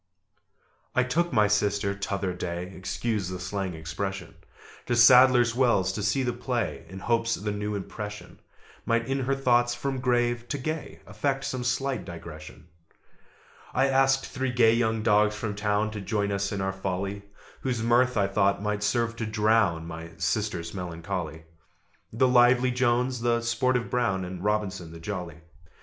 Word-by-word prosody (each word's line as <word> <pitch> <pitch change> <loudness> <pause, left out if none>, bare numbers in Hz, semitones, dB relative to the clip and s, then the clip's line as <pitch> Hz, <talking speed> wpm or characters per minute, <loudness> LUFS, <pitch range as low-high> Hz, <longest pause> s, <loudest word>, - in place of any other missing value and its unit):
I 130 - +4
took 170 +7 0
my 105 -1 +4
sister 100 -1 +1
t'other 100 -2 -3
day 90 +1 -5
(Excuse 100 +1 -2
the 90 0 -5
slang 95 -1 -3
expression) 85 +3 -5 0.5
To 120 - +1
Sadler's 125 0 +7
Wells 120 -7 +2
to 105 - -4
see 105 +6 +1
the 120 -1 -1
play, 120 -2 -3
In 95 - -9
hopes 115 +2 +1
the 105 +1 -3
new 105 0 -3
impression 105 +1 -7 0.4
Might 115 0 0
in 135 +1 0
her 135 +1 0
thoughts, 120 -2 +2
from 135 +2 -3
grave 120 -1 +1
to 145 - -1
gay 155 +3 -5
Effect 135 +6 -2
some 130 -1 -3
slight 130 +1 -1
digression. 80 -2 -10 1.1
I 135 +2 +3
asked 135 0 +3
three 130 0 -3
gay 115 -2 +5
young 115 -2 +1
dogs 105 -1 +3
from 105 -1 -3
town 105 +1 0
To 105 -1 -6
join 100 0 -1
us 100 0 -1
in 100 -2 -2
our 95 0 -1
folly, 95 +1 -3 0.4
Whose 125 -4 -2
mirth, 120 +1 +3
I 100 - +3
thought, 100 0 +1
might 105 0 -2
serve 115 +3 0
to 110 - -3
drown 105 -6 +2
My 80 0 -8
sister's 90 -2 -2
melancholy: 85 -3 -5 0.7
The 125 +4 +3
lively 125 0 +5
Jones, 125 0 +1
the 120 0 +1
sportive 120 +1 0
Brown, 95 -7 0
And 90 0 -7
Robinson 95 -5 -2
the 85 - -10
jolly. 85 -3 -6
105 Hz, 160 wpm, -27 LUFS, 95-120 Hz, 1.1 s, Sadler's